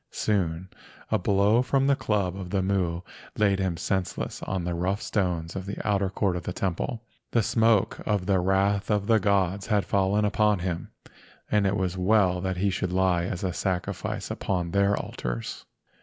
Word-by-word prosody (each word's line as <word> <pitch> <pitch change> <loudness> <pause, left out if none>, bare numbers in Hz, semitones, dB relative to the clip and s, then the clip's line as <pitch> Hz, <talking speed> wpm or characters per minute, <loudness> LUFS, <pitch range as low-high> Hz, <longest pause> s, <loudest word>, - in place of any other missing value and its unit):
Soon 90 -4 -1 0.4
a - - +3
blow 100 +4 +3
from 135 +2 +1
the 140 0 +4
club 100 -7 -1
of 95 -2 -6
the 95 0 0
Mu 90 -3 0 0.4
laid 100 -2 +3
him 95 -3 -1
senseless 95 +1 -2
on 95 -2 -2
the 90 0 -2
rough 90 +4 -1
stones 90 -7 -1
of 95 0 -5
the 100 - -4
outer 100 -2 +2
court 95 -1 0
of 90 - -3
the 90 - -5
temple. 95 +6 -2 0.3
The 115 - +2
smoke 110 -1 +2
of 105 -4 0
the 95 0 +2
wrath 95 +2 +1
of 105 -2 +1
the 110 0 +4
gods 100 -1 +1
had 105 -3 +2
fallen 100 +2 +2
upon 105 0 +2
him, 90 -1 -3 0.6
and 105 -2 +3
it 100 +1 +1
was 95 -1 -2
well 90 -2 +3
that 95 -1 -2
he 100 +2 +1
should 95 -1 -2
lie 90 -2 +2
as 90 0 -4
a 90 -2 -1
sacrifice 90 0 -3
upon 90 -3 -2
their 100 +1 +3
altars. - - -5
95 Hz, 185 wpm, -26 LUFS, 90-105 Hz, 0.6 s, the